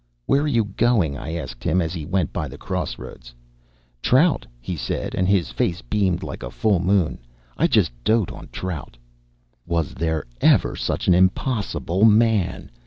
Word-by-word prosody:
"Where 140 - +3
are 150 - 0
you 120 -6 +2
going?" 100 -7 +1
I 80 +4 -5
asked 65 -6 -6
him, 90 +2 +2
as 80 -2 -1
he 80 -4 -5
went 95 0 0
by 75 -4 -2
the 70 +2 -10
cross - - -3
roads. - - -11 0.7
"Trout," 150 +6 +3
he 75 +9 -5
said, 65 -6 -3
and 90 - +1
his 95 -3 +2
face 90 +1 -1
beamed 95 -4 0
like - - -6
a - - -5
full 105 -5 +1
moon. 95 -2 +1 0.4
"I - - +3
just - - +3
dote 110 -3 +2
on - - -10
trout." 85 -9 -6 0.7
Was 85 -3 -1
there 80 0 -1 0.2
ever - - +4
such - - -2
an 90 - +6
impossible 95 0 +1
man! 110 -3 +3
90 Hz, 175 wpm, -22 LUFS, 80-105 Hz, 0.7 s, an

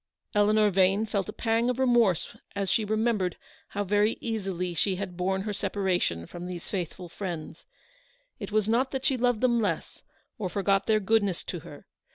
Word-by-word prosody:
Eleanor 210 0 +4
Vane 195 +3 +3
felt 205 -2 -2
a - - -2
pang 225 +2 +1
of 250 - 0
remorse 240 -9 +3 0.2
as 200 -1 0
she 220 - +2
remembered 215 -4 0 0.3
how 205 - -2
very 205 +3 +2
easily 190 -6 -2
she 190 +3 +1
had 185 -1 -5
borne 190 +2 0
her 210 0 -3
separation 190 - 0
from 175 - -8
these 180 -2 -6
faithful 180 -1 -4
friends. 175 -3 -6 0.7
It - - -6
was 215 -1 +2
not 245 +4 +2
that 265 -1 -4
she 270 - +3
loved 245 -2 +1
them 240 -2 +3
less, 185 -7 -2 0.4
or 190 -4 -2
forgot 195 0 +1
their 215 -1 +4
goodness 205 -3 +1
to 175 - -5
her. 155 -3 -12
200 Hz, 180 wpm, -28 LUFS, 185-220 Hz, 0.7 s, Eleanor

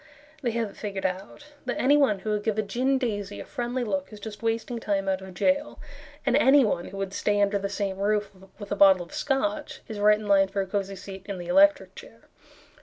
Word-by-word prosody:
They 250 - 0
have 225 -3 -1
it - - -19
figured 200 -2 -4
out 195 +11 -5
That 250 - -2
anyone 275 -5 +4
who 215 - -3
would 210 -1 0
give 220 -1 -1
a 215 - +1
gin 255 +7 0
daisy 205 -6 -3
a - - -7
friendly 245 -1 -3
look 190 -4 -2
Is 210 - -10
just 210 -1 -8
wasting 230 +1 -2
time 195 -3 -1
out 190 0 0
of 190 -1 -10
jail, 285 +8 0 0.5
And 260 -2 +3
anyone 265 -10 +4
who 195 - -9
would 195 0 -4
stay 205 0 0
under 200 0 +2
the 200 0 -3
same 195 -1 -3
roof 205 0 0 0.3
With 205 -1 -9
a - - +1
bottle 195 -2 +6
of - - -17
Scotch 300 +2 -2
Is 215 -2 -6
right 210 +1 +5
in 215 -1 -8
line 195 -1 +5
for 195 +1 -4
a - - -2
cozy 195 0 -3
seat 190 0 -10
in 200 -2 -4
the 175 - -7
electric 290 +2 +4
chair. - - -13
210 Hz, 230 wpm, -26 LUFS, 195-250 Hz, 0.5 s, bottle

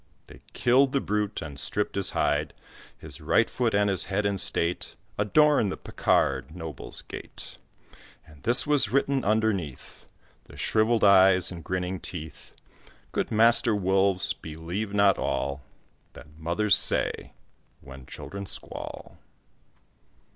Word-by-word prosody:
They - - -16
killed 130 +2 +3
the 140 - +2
brute 105 -5 -2
and 70 -3 -6
stripped 105 +7 +2
his 100 -2 0
hide; - - -1 0.4
His - - -7
right - - +2
foot 120 -4 -1
and 100 0 +2
his 95 -2 +3
head 100 +2 -2
in 100 -1 0
state 85 0 +1 0.2
Adorn 145 +2 +3
the - - -5
Picard 70 +4 -1
noble's 80 -6 -8
gate; - - -10 0.7
And 75 -3 -18
this 120 +2 +4
was 145 -7 +3
written 135 +1 0
underneath 105 - -2 0.4
The - - -15
shrivelled 110 +1 +1
eyes 95 -2 +5
and 85 -2 -9
grinning 90 0 -3
teeth 80 -4 -10 0.6
"Good - - -2
Master 115 0 +4
Wolves, 95 0 +2
believe 85 +7 -6
not 100 -1 +3
all 70 0 -2 0.5
That 75 +1 -15
mothers 85 +6 +1
say - - 0 0.5
when 65 -1 -13
children 100 0 -8
squall." - - -6
100 Hz, 130 wpm, -26 LUFS, 85-110 Hz, 0.7 s, eyes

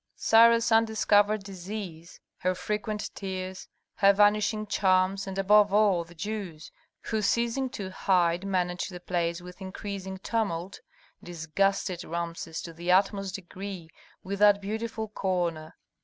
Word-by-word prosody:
Sarah's 230 +1 +5
undiscovered 215 -2 +3
disease, 185 -3 -8 0.2
her 185 0 0
frequent 210 +2 -3
tears, 185 -1 -6 0.3
her 200 0 +6
vanishing 210 +1 +2
charms, 195 -1 +1
and 190 0 -5
above 205 +1 +5
all 200 -4 +3
the 170 +1 -16
Jews, 190 -5 -6 0.3
who, 220 -1 -2
ceasing 235 +5 0
to 195 -6 -6
hide, 180 -2 +1
managed 180 -2 -1
the 180 - -8
place 175 -1 -2
with 180 +2 -12
increasing 190 0 -6
tumult, 195 -3 -2 0.4
disgusted 175 +2 -1
Rameses 170 -1 -5
to 165 - -8
the 170 +2 -2
utmost 195 0 +2
degree 190 -3 -8 0.3
with 195 +1 -4
that 205 -1 +6
beautiful 220 +2 -4
corner. 175 -6 -2
195 Hz, 125 wpm, -28 LUFS, 180-210 Hz, 0.4 s, her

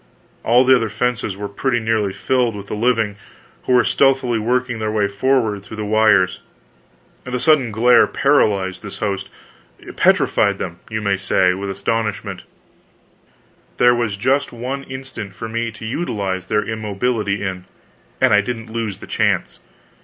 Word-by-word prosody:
All 120 +3 +5
the 130 0 +6
other 115 -3 0
fences 120 -4 -2
were 100 0 -4
pretty 120 +5 -1
nearly 110 -3 0
filled 125 +1 0
with 100 -1 -7
the - - -7
living, 110 -2 0 0.5
who 130 - +1
were 125 -1 +5
stealthily 130 -2 +2
working 125 +1 -1
their 110 0 -2
way 105 -2 +1
forward 110 0 0
through 105 +2 -10
the 105 - -3
wires. 105 -3 +3 0.8
The 125 0 -3
sudden 145 -5 +3
glare 120 +3 +5
paralyzed 100 -10 +1
this 105 -3 -8
host, 100 -3 -3 0.7
petrified 100 -1 +3
them, 85 -2 -6
you 110 -1 -3
may 100 -2 +1
say, 95 -1 +2
with 100 +2 -5
astonishment; 110 +1 -3 1.3
there 120 0 +5
was 115 -4 -1
just 135 +6 +1
one 125 +4 -4
instant 130 -7 -7
for 115 - -6
me 115 +1 -2
to 110 - -9
utilize 100 - -3
their 105 +1 +1
immobility 105 -1 -2
in, 95 -2 -4 0.5
and - - +4
I 105 - +6
didn't 115 +1 -6
lose 110 -5 -3
the - - -11
chance. - - 0
110 Hz, 155 wpm, -19 LUFS, 100-125 Hz, 1.3 s, the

